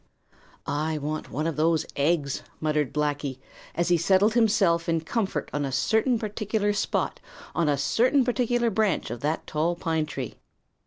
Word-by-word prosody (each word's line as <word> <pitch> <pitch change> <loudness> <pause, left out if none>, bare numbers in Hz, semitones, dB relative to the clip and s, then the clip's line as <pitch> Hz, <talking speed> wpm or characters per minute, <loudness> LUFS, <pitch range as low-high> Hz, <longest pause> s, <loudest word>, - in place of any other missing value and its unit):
"I 155 +2 -1
want 150 +1 -4
one 155 +3 -2
of 165 -2 -2
those 160 0 +2
eggs," 145 -1 +1 0.2
muttered 150 -3 0
Blacky, 145 -3 -1 0.4
as 170 +1 0
he 175 - +5
settled 190 +5 +3
himself 200 -8 +3
in 165 -1 +1
comfort 195 +4 -2
on 145 - -1
a 135 - -2
certain 220 - +2
particular 210 -1 -1
spot 200 - -1 0.3
on 165 -3 +1
a 145 - +2
certain 240 - +3
particular 240 -1 +1
branch 210 - 0
of 120 - -5
that 150 +5 -2
tall 160 +3 0
pine 160 -2 -1
tree. - - -5
165 Hz, 160 wpm, -26 LUFS, 150-210 Hz, 0.4 s, he